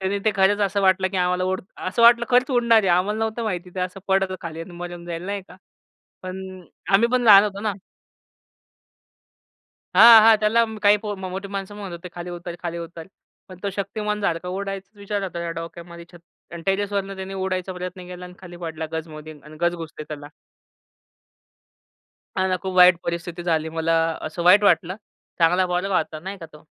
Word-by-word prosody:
त्याने 190 +1 -1
ते 215 - +4
खरंच 195 +2 +3
असं 200 0 +1
वाटलं 190 0 +3
की 190 - -5
आम्हाला 180 0 +1
उड 185 0 -1 0.3
असं 235 +5 0
वाटलं 235 0 +7
खरंच 250 +2 +3
उडणार 235 -3 +4
आहे. 195 - 0
आम्हाला 205 +4 0
नव्हतं 225 +1 -2
माहिती 180 -4 -4
ते 185 - -3
असं 185 +1 -4
पडतं 190 -1 +1
खाली 165 -2 -7
आणि 165 - -8
मरून 175 -1 -7
जाईल 170 -1 -5
नाही 200 0 -3
का. - - -14 0.7
पण 185 +1 -6 0.5
आम्ही 230 +4 +5
पण 255 - +2
लहान 205 -3 +8
होतो 200 -1 -4
ना. 210 0 -1 2.2
हां, 225 +3 +10
हां 225 0 +7
त्याला 220 +2 +3
म 220 -1 -8
काही 205 0 +5
पो 210 -1 -3
मो 190 -1 -6
मोठी 190 +2 -6
माणसं 195 0 -6
म्हणत 200 -3 -7
होते, 170 +1 -8
खाली 175 0 -6
उतर, 175 0 -7
खाली 170 -1 -3
उतर. 165 -1 -8 0.4
पण 185 - -12
तो 200 - 0
शक्तिमानसारख 200 -3 -2
उडायचा 195 +2 -6
विचार 200 0 -3
होता 175 -3 -5
त्या 170 0 -3
डोक्यामध्ये 170 0 -9
छत 175 - -14 0.3
आणि 170 - -7
टेरेसवरनं 195 0 -1
त्याने 190 0 -7
उडायचा 185 -1 -3
प्रयत्न 180 0 -7
केला 180 0 -8
आणि 180 - -12
खाली 175 -2 -11
पडला 160 -2 -5
गजमध्ये 155 -1 -7
आणि 155 +1 -13
गज 175 0 +2
घुसते 160 -2 -8
त्याला. 145 -1 -9 2.1
हां 190 - +2
ना, 185 - +1
खूप 190 -1 -3
वाईट 180 -1 +7
परिस्थिती 170 0 -4
झाली. 160 -2 0
मला 165 0 -1 0.3
असं 165 +2 -5
वाईट 190 +4 +6
वाटलं. 185 -2 +3 0.4
चांगला 180 +3 +4
पोरगा 180 +2 0
होता 155 0 -3
नाही 190 +4 -7
का 165 - -9
तो. 150 - -15
185 Hz, 190 wpm, -23 LUFS, 175-200 Hz, 2.2 s, हां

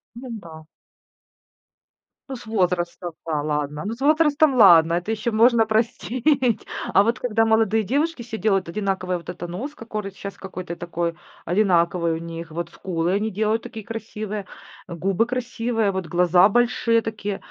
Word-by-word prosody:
Ну 255 +2 -9
да. 160 -3 -12 1.7
Ну, 265 - -4
с 235 - -13
возрастом, 180 -4 -1 0.2
да, 155 -3 -1
ладно. 150 0 -2
Ну, 210 - -3
с 235 - -17
возрастом 305 0 +4
ладно, 170 -8 +7
это 175 +5 -2
ещё 225 +1 -1
можно 225 +1 +4
простить. 240 +3 +1 0.3
А 195 - +7
вот 230 +4 0
когда 225 -3 +1
молодые 220 -1 +3
девушки 285 - -1
все 225 -1 -6
делают 195 -5 +1
одинаковый 190 -1 -2
вот 170 0 -10
это 175 0 -6
нос, 245 +13 -5
кокорый 215 -5 -6
щас 200 0 -8
какой-то 185 -2 -7
такой 170 -1 -3 0.3
одинаковый 175 -2 +2
у 160 - -2
них. 165 0 -7
Вот 170 +1 -4
скулы 175 0 -2
они 210 +2 0
делают 215 +3 0
такие, 220 -2 -8
красивые, 215 -2 -5 0.4
губы 185 +5 0
красивые, 235 -3 -1
вот 190 -3 -3
глаза 175 +3 +4
большие 230 0 +2
такие. 210 -2 -4
205 Hz, 155 wpm, -23 LUFS, 175-230 Hz, 1.7 s, ладно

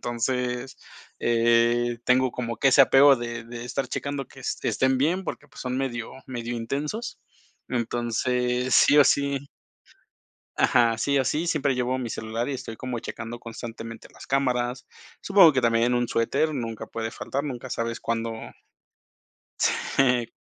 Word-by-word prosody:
Entonces, 125 +1 -2 0.4
eh, 120 0 +2
tengo 130 0 +3
como 115 -2 -4
que 135 - +3
ese 135 - +6
apego 135 +1 +6
de 120 -1 -5
de 120 0 -8
estar 135 +2 -3
checando 140 -2 -4
que - - -14
es - - -3
estén 130 0 +1
bien 175 +7 +1
porque, 150 - -6
pues, - - -13
son 125 0 -3
medio 120 -4 -3
medio 120 -1 -4
intensos. 145 - -4 0.5
Entonces, 125 +1 -1
sí 145 - +6
o - - +10
sí 140 0 +1 1.1
Ajá, 115 -1 +3
sí 140 +3 +1
o 130 - +2
sí, 160 +6 -1
siempre 140 -5 +1
llevo 125 +1 0
mi 120 -3 -4
celular 110 +2 -3
y - - -2
estoy 115 -4 -6
como 125 -2 -4
checando 120 0 -7
constantemente 115 -1 -8
las - - -13
cámaras. 125 -2 0 0.4
Supongo 195 -5 +6
que 130 -2 0
también 115 +1 +2
un 120 0 +1
suéter 135 +7 +1
nunca 115 -4 -4
puede 115 0 -4
faltar, 140 - -4
nunca 130 -3 -6
sabes 115 0 -3
cuándo 115 0 -2 1.7
Sí, 125 -3 +3
125 Hz, 155 wpm, -25 LUFS, 115-135 Hz, 1.7 s, o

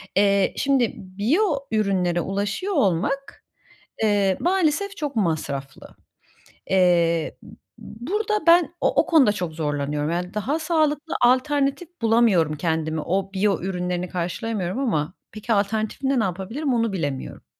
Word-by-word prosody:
Eee, 200 -1 +3
şimdi 270 -4 +2
biyo 205 - 0 0.3
ürünlere 190 -5 +1
ulaşıyor 200 - -2
olmak, 275 - 0 0.6
eee, 200 -3 +2
maalesef 380 +2 0
çok 295 -4 -4
masraflı. 150 -8 -3 0.8
Eee, 170 -3 +2
b - - -13 0.3
b 235 +3 -10
burada 425 0 -1
ben 340 0 +5
o - - +2
o - - -14
konuda 290 -10 +5
çok 180 -5 -4
zorlanıyorum. 145 -1 -2
Yani 180 +3 -3
daha 265 +9 -1
sağlıklı 315 -1 0
alternatif 275 +5 +2
bulamıyorum 220 -9 +3
kendime, 160 0 -1
o 190 +4 -2
biyo 195 -1 +1
ürünlerini 180 -1 -2
karşılayamıyorum 185 +3 -3
ama 180 - -1 0.2
peki, 215 +2 -3
alternatifinde 220 +6 0
ne - - +1
yapabilirim, 225 - -2
onu 230 -2 0
bilemiyorum. 145 -8 -4
205 Hz, 125 wpm, -23 LUFS, 175-275 Hz, 0.8 s, ben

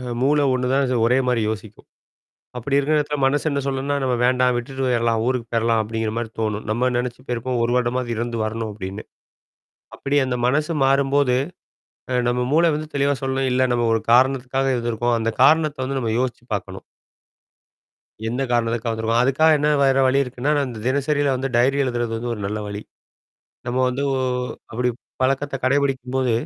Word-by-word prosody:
அ - - -8 0.2
மூள 145 +3 +3
ஒண்ணுதான், 130 +1 +1
ஒரே 125 +2 +3
மாரி 125 -2 +1
யோசிக்கும். 110 -1 -8 0.7
அப்படி 135 +4 -1
இருக்கிற 150 +2 +1
இடத்துல, 150 0 -2
மனசு 145 +2 +1
என்ன 140 -1 -1
சொல்லுனா, 135 +1 -1
நம்ம 125 -1 +1
வேண்டாம் 125 0 +3
விட்டுட்டு 130 +2 -4
போயிரலாம். 115 -2 +1
ஊருக்கு 125 -2 -1
போயிரலாம். 115 -1 +2
அப்படிங்கிற 110 0 -3
மாரி 120 -2 -4
தோணும். 110 -1 -2
நம்ம 125 +3 +1
நெனச்சு 125 0 -3
போயிருப்போம். 125 0 -2
1 120 - 0
வருடமாவது 125 0 0
இருந்து 115 0 -3
வரணும், 110 0 -3
அப்படின்னு. 100 0 -7 0.9
அப்படி 140 +1 -2
அந்த 125 -1 -1
மனசு 150 +6 +1
மாறும்போது, 135 -1 +3 0.8
அ - - 0 0.2
நம்ம 125 0 0
மூள 165 +2 +4
வந்து 155 0 -5
தெளிவா 140 0 +2
சொல்லும், 135 0 0
இல்ல 130 +1 +2
நம்ம 120 -1 +1
ஒரு 115 - +1
காரணத்துக்காக 130 +1 +3
இருந்துருக்கோம். 120 0 0
அந்த 115 0 0
காரணத்தை 155 +1 +4
வந்து, 135 0 -2
நம்ம 110 -2 -1
யோசிச்சு 125 -1 -3
பாக்கணும். 95 -1 -7 1.4
என்ன 120 +3 -2
காரணத்துக்காக 115 -1 0
வந்துருக்க 110 0 -1
அதுக்காக 140 +5 +3
என்ன 150 +1 +1
வேற 135 -1 +3
வழி 130 +1 +3
இருக்குனா, 125 +2 -3
நான் 135 -3 -1
தினசரில 140 +1 +1
வந்து 135 +1 -2
டைரி 130 +3 +3
எழுதுறது 120 -2 -2
வந்து, 120 +2 -4
ஒரு 105 - -8
நல்ல 105 +2 -3
வழி. 100 0 -5 0.9
நம்ம 125 +1 -1
வந்து 125 +2 -2
ஒ - - 0 0.5
அப்படி 125 +2 -1 0.3
பழக்கத்தை 135 +2 0
கடைபிடிக்கும்போது, 130 -2 +1
125 Hz, 165 wpm, -22 LUFS, 115-135 Hz, 1.4 s, மூள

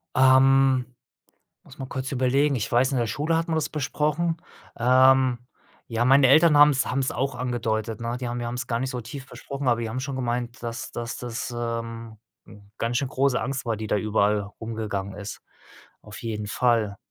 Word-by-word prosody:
Ähm, 130 0 +5 0.8
muss 135 - -16
mal 135 - -4
kurz 130 +2 -4
überlegen, 135 +2 +2
ich 115 - -3
weiß, 125 +3 +3
in 135 - 0
der 120 -1 0
Schule 150 +9 -1
hat 165 - -1
man 165 - -1
das 160 - -1
besprochen. 150 +3 -1 0.4
Ähm, 130 0 +4 0.5
ja, 115 +1 0
meine 135 +1 +6
Eltern 155 +3 +6
haben's 145 -2 +6
haben's 130 +1 -1
auch 135 -1 -2
angedeutet, 115 -3 -2
ne? 115 +1 -3
Die 125 - -4
haben 120 +1 -3
wir 120 - -3
haben's 120 0 -4
gar 115 -2 -1
nicht 130 +1 -2
so 125 -2 -4
tief 130 +4 -8
besprochen, 140 -1 -6
aber 120 -1 +3
die 115 - -3
haben 120 +4 -3
schon 135 0 -4
gemeint, 120 -1 -3
dass 115 0 -5
dass 120 0 -5
das, 120 0 -5
ähm, 115 -1 -5 0.6
ganz 115 +1 -1
schön 135 - -1
große 135 -1 +1
Angst 135 0 -3
war, 115 -1 0
die 110 +1 -5
da 105 - +1
überall 105 0 +1 0.2
rumgegangen 105 -3 -4
ist. 105 0 -8 0.6
Auf - - -11
jeden 105 -2 -4
Fall. 115 -3 +1
125 Hz, 190 wpm, -25 LUFS, 115-135 Hz, 0.8 s, meine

